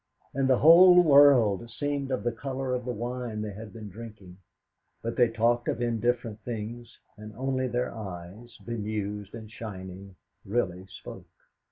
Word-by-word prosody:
And 135 0 0
the 130 - +5
whole 180 +4 +8
world 135 - +5
seemed 140 +4 -3
of 130 - -2
the 120 - 0
colour 130 +2 -4
of 125 -1 -3
the 125 - -2
wine 120 -1 -4
they 105 - -5
had 110 +2 -9
been 110 -2 -9
drinking; 100 -3 -11 0.7
but 115 +1 -3
they 120 -2 +4
talked 115 +1 +1
of - - -1
indifferent 120 -1 -1
things, 120 0 -7 0.2
and 105 0 -11
only 130 +1 -1
their 125 0 -2
eyes, 105 +3 -9
bemused 105 -2 -4
and 110 -2 -10
shining, 95 -3 -9 0.3
really 95 -4 -2
spoke. 90 - -11
115 Hz, 155 wpm, -27 LUFS, 105-125 Hz, 0.7 s, whole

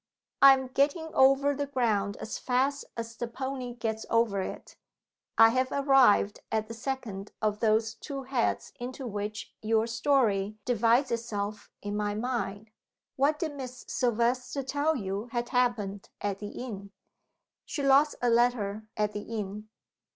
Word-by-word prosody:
I 275 0 +10
am 265 0 -1
getting 290 +5 0
over 275 +2 +5
the 285 0 -3
ground 215 -7 0
as 220 - -5
fast 265 +3 0
as 230 0 -5
the 240 - -3
pony 255 0 -5
gets 220 -2 -3
over 230 -4 +2
it. - - -7 0.6
I 225 - +9
have 255 +2 0
arrived 270 -7 +4
at 220 -1 0
the 230 - -7
second 230 -5 -5
of 210 -1 0
those 220 0 +2
two 275 +2 -7
heads 255 -2 -1
into 255 +2 -6
which 210 -1 -5
your 220 0 +2
story 225 -5 +1
divides 240 +3 +3
itself 215 -3 -3
in 205 0 -3
my 205 0 -1
mind. 215 -3 -3 0.4
What 285 +3 +2
did 310 -2 -3
Miss 255 -2 -8
Silvester 245 +3 0
tell 290 +4 0
you 200 -1 -3
had 240 0 -2
happened 220 -6 0
at 200 -1 -2
the 205 - -5
inn?" 205 -6 -7 0.7
"She 290 - -4
lost 275 +2 +5
a 245 - +4
letter 220 -3 +1
at 210 -1 +1
the 205 - -4
inn." 210 -1 -6
235 Hz, 150 wpm, -29 LUFS, 210-265 Hz, 0.7 s, I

